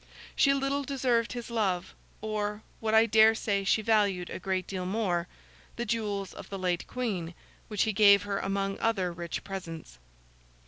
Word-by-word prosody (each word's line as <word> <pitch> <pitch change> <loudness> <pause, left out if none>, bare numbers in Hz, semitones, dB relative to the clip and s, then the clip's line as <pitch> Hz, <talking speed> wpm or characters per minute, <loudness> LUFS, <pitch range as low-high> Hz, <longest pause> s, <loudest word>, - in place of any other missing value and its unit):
She 275 - +5
little 275 +1 0
deserved 250 -4 0
his 240 -1 -6
love, 190 -6 -1 0.3
or—what 215 +1 -3
I 220 +1 +7
dare 220 0 +6
say 200 -3 -1
she 215 +3 +2
valued 200 -5 +2
a - - -5
great 185 -1 -1
deal 185 -1 -4
more—the 190 +3 -4
jewels 205 -3 -2
of - - -10
the 195 - -5
late 180 -2 -1
Queen, 190 -10 -3 0.3
which 210 -2 0
he 220 - 0
gave 200 -1 +6
her 200 -1 -2
among 195 0 -2
other 190 -6 0
rich 170 -1 -5
presents. 165 - -7
205 Hz, 155 wpm, -29 LUFS, 185-225 Hz, 0.3 s, I